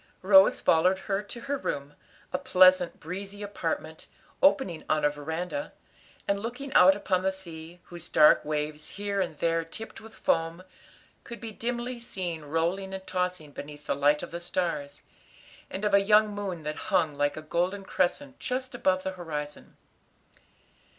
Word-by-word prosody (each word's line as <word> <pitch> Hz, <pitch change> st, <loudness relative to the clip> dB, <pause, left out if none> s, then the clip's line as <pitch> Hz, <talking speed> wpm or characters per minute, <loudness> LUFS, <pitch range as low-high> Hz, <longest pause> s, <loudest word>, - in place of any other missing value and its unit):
Rose 190 Hz, 0 st, +7 dB
followed 180 Hz, +4 st, +4 dB
her 195 Hz, +1 st, -2 dB
to 210 Hz, +3 st, -8 dB
her 275 Hz, +2 st, -2 dB
room, 140 Hz, -, -4 dB, 0.4 s
a 180 Hz, -, 0 dB
pleasant, 185 Hz, -1 st, +5 dB
breezy 195 Hz, +5 st, -6 dB
apartment, 205 Hz, 0 st, -4 dB, 0.3 s
opening 265 Hz, -, +3 dB
on 155 Hz, -1 st, +2 dB
a 145 Hz, -, +4 dB
veranda, 160 Hz, -, -4 dB, 0.5 s
and 200 Hz, 0 st, +1 dB
looking 250 Hz, +5 st, -5 dB
out 190 Hz, +1 st, +7 dB
upon 185 Hz, -2 st, 0 dB
the 190 Hz, +1 st, +1 dB
sea, 170 Hz, -2 st, -9 dB
whose 175 Hz, -1 st, -8 dB
dark 150 Hz, -1 st, +6 dB
waves, 150 Hz, 0 st, -2 dB
here 200 Hz, -1 st, -1 dB
and 170 Hz, -5 st, -3 dB
there 165 Hz, +1 st, +1 dB
tipped 190 Hz, +7 st, -8 dB
with 225 Hz, 0 st, -13 dB
foam, 165 Hz, +2 st, 0 dB, 0.6 s
could 235 Hz, -, -9 dB
be 225 Hz, -1 st, -6 dB
dimly 240 Hz, +2 st, -3 dB
seen 185 Hz, -9 st, -4 dB
rolling 175 Hz, +6 st, -1 dB
and 190 Hz, 0 st, -8 dB
tossing 180 Hz, -4 st, -2 dB
beneath 145 Hz, +1 st, -9 dB
the -, -, 0 dB
light 145 Hz, +1 st, +3 dB
of -, -, -7 dB
the 170 Hz, -, -4 dB
stars 165 Hz, -5 st, -3 dB, 0.7 s
and 195 Hz, +2 st, -4 dB
of 205 Hz, -, +1 dB
a 200 Hz, -, +7 dB
young 210 Hz, +1 st, +4 dB
moon 195 Hz, -5 st, -4 dB
that 150 Hz, 0 st, -4 dB
hung 175 Hz, -6 st, +3 dB
like 145 Hz, +1 st, 0 dB
a -, -, -4 dB
golden 180 Hz, +5 st, -1 dB
crescent 265 Hz, +10 st, -1 dB
just 255 Hz, 0 st, -3 dB
above 185 Hz, -6 st, +1 dB
the 190 Hz, -, -2 dB
horizon. 150 Hz, -5 st, -6 dB
185 Hz, 165 wpm, -28 LUFS, 160-205 Hz, 0.7 s, Rose